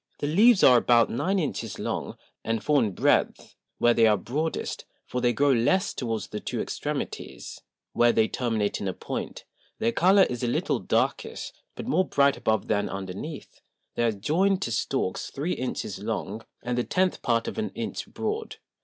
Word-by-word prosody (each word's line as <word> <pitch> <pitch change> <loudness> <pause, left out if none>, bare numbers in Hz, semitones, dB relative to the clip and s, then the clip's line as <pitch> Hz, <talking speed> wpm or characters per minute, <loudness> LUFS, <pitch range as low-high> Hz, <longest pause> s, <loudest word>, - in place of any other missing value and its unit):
The - - -3
Leaves 205 +8 +5
are 125 -2 +8
about 120 0 +4
nine 190 +11 0
Inches 115 - -3
long, - - -4 0.3
and 115 -1 -2
four 150 +1 +3
in 105 -4 -1
breadth, - - +1 0.2
where 120 - +4
they 115 -1 +5
are 105 -1 +4
broadest; 150 - -3 0.2
for 125 - -3
they 120 - +3
grow 140 +3 +3
less 135 +10 +2
towards 115 -4 -3
the 105 - -4
two - - -4
Extremities, - - -5 0.3
where 120 0 +4
they 110 -1 +3
terminate 110 -5 -1
in 100 - -2
a 95 - -1
point: - - -6 0.3
their 115 - +1
Colour 190 +8 +5
is 125 -1 -2
a 125 - 0
little 120 - 0
darkish, - - -1 0.2
but - - -6
more 185 - +1
bright 140 0 +3
above 110 -2 0
than 105 -1 0
underneath; 100 - -7 0.3
they - - -2
are 115 -1 +3
joined 185 - +1
to - - -3
Stalks 130 -9 -1
three 155 +6 -2
Inches 130 0 -4
long, 105 +3 -4 0.2
and 125 +1 -1
the - - +1
tenth 185 +5 0
part 115 -1 +1
of - - -4
an 220 - -1
Inch - - -4
broad. 435 +1 -4
125 Hz, 180 wpm, -26 LUFS, 115-160 Hz, 0.3 s, are